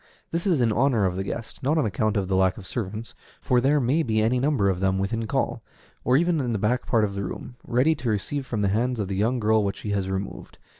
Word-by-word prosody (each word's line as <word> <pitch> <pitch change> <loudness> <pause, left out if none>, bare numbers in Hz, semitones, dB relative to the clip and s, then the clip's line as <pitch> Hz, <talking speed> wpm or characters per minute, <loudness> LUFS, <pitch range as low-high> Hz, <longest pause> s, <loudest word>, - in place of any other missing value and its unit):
This 170 +3 -1
is 165 -8 +3
in 115 -2 +3
honor 120 -2 +2
of 90 -1 0
the 95 - -2
guest, 115 +3 -6
not 145 +5 +1
on 155 - +2
account 110 0 0
of 95 -2 0
the 95 - 0
lack 95 0 +2
of 100 - -9
servants, 110 +1 -5 0.3
for 125 -1 +2
there 145 +3 +3
may 135 +5 +2
be 110 -7 0
any 115 +4 +2
number 135 -7 +2
of 95 -2 +1
them 95 0 +1
within 110 +4 -1
call, - - -1 0.4
or 125 +1 +4
even 170 0 +2
in 120 -3 -1
the - - 0
back 115 +6 0
part 115 -3 +3
of 100 -2 -1
the 100 0 -3
room, 120 +6 -6
ready 130 +7 +3
to 130 -6 -3
receive 115 +7 -1
from 115 -5 -3
the 100 - +2
hands 120 +4 0
of 100 -3 -2
the 95 - -2
young 115 +6 +1
girl 110 -1 +3
what 100 -1 -1
she 105 - -5
has 100 -2 -1
removed. 95 +1 -5
110 Hz, 265 wpm, -25 LUFS, 100-125 Hz, 0.4 s, or